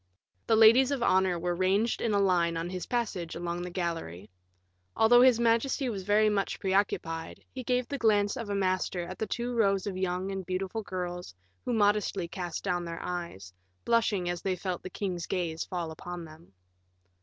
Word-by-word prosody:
The 225 - +4
ladies 230 +4 +7
of 275 -4 -1
honor 185 -1 +3
were 175 +1 -1
ranged 190 +6 +1
in 230 - 0
a 205 - +2
line 175 -4 +2
on 170 +2 -3
his 185 -1 -5
passage 210 -9 -2
along 175 0 -3
the 180 - -4
gallery. 165 - -4 0.6
Although 240 +2 +6
his 250 -2 +6
majesty 235 +3 +1
was 200 -4 -4
very 210 +3 +3
much 205 -2 0
preoccupied, 190 -4 -1
he 260 - -6
gave 250 0 0
the 280 - -4
glance 205 -3 +3
of 230 -3 -5
a 200 - -1
master 185 -2 0
at 185 - -8
the 220 - -2
two 240 +3 -3
rows 195 -5 +2
of 200 -3 -3
young 185 +1 -2
and 195 -1 -4
beautiful 190 +4 -3
girls, 180 - -5 0.3
who 245 - -1
modestly 205 -4 +1
cast 175 -1 -5
down 180 -3 -1
their 170 -1 -6
eyes, 170 - -5 0.3
blushing 225 -6 +2
as 175 -1 -2
they 190 -1 -1
felt 180 0 -4
the - - -7
king's 180 -3 -4
gaze 170 -3 -2
fall 170 -3 -4
upon 175 +2 -7
them. 160 +2 -15
190 Hz, 190 wpm, -29 LUFS, 175-215 Hz, 0.6 s, ladies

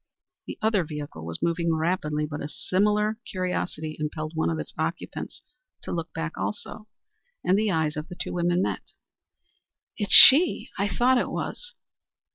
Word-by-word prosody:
The - - -6
other 215 -4 +2
vehicle 145 - -7
was 85 0 -3
moving 170 -1 +1
rapidly, 155 -2 -1
but 150 -1 -6
a 145 - -5
similar 210 +6 0
curiosity 180 -5 -3
impelled 155 0 -4
one 160 0 0
of 165 - -2
its - - -6
occupants - - -5 0.4
to - - -6
look 165 -1 -3
hack 165 0 -4
also, 210 0 -5 0.6
and 185 - +3
the 215 +1 +1
eyes 160 -4 0
of 150 +1 -5
the 180 - -9
two - - -4
women 175 +1 +1
met. - - -4 1.0
"It's 205 -2 -3
she; 315 +6 +8
I 200 +1 0
thought 245 +6 +3
it - - -2
was." 485 0 -5
170 Hz, 160 wpm, -26 LUFS, 155-205 Hz, 1.0 s, she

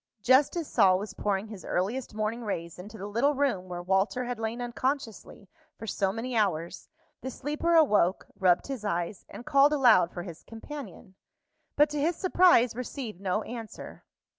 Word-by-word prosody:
Just 260 +5 +4
as 330 -4 -3
Sol 185 -1 +4
was 200 +1 -6
pouring 205 +1 -2
his 210 -4 -9
earliest 210 +6 -2
morning 220 +2 -2
rays 170 -5 -5
into 205 +4 -10
the 200 - -7
little 235 +8 +1
room 245 -10 -1
where 175 0 -5
Walter 195 +7 +1
had 245 -2 -4
lain 225 +2 -3
unconsciously 240 -4 -4 0.3
for 225 - -8
so 195 -2 0
many 235 +4 -4
hours, 175 -6 -1 0.3
the 260 - -4
sleeper 300 +6 -1
awoke, 210 - +3
rubbed 180 -2 +3
his 270 -6 -6
eyes, 175 -1 -3
and 240 - -10
called 280 +2 +4
aloud 235 - +5
for 175 - -6
his 170 -3 -9
companion, 225 - -10 0.6
but, 295 +1 +5
to 295 -1 -2
his 330 +4 +1
surprise, 355 - +4
received 245 -5 -6
no 200 +2 -1
answer. 230 -2 -9
225 Hz, 170 wpm, -28 LUFS, 190-265 Hz, 0.6 s, aloud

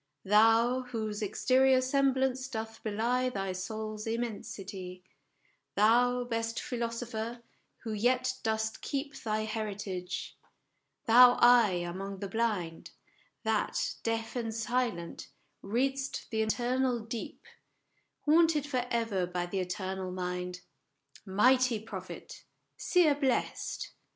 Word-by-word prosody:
Thou, 225 +5 +5
whose 215 -3 -3
exterior 255 +5 +3
semblance 265 0 +1
doth 225 -2 -6
belie 235 +4 0
Thy 195 -5 -3
soul's 215 +3 -5
immensity; 195 -5 -5 0.7
Thou 245 +4 +4
best 230 -1 -2
philosopher, 235 -1 -4 0.4
who 225 - -3
yet 250 +4 +1
dost 220 0 -1
keep 280 0 -3
Thy 215 -1 -2
heritage; 205 -4 -4 0.7
thou 245 +2 +8
eye 225 -8 +5
among 195 +3 -5
the 200 +1 -4
blind, 195 -6 -2 0.5
That, 220 -2 0
deaf 225 0 -2
and 230 -2 -2
silent, 225 -6 -2 0.3
read'st 270 +6 -2
the 220 -1 +1
eternal 245 +2 +1
deep, 225 +1 -7 0.8
Haunted 315 -1 +4
for 255 -4 -2
ever 225 -6 0
by 180 0 -2
the 190 +2 -3
eternal 185 +1 -3
mind 180 0 -4 0.7
Mighty 250 +4 +4
Prophet! 220 - -9 0.3
Seer 345 -5 +3
blest 275 -3 -1
225 Hz, 105 wpm, -31 LUFS, 200-250 Hz, 0.8 s, thou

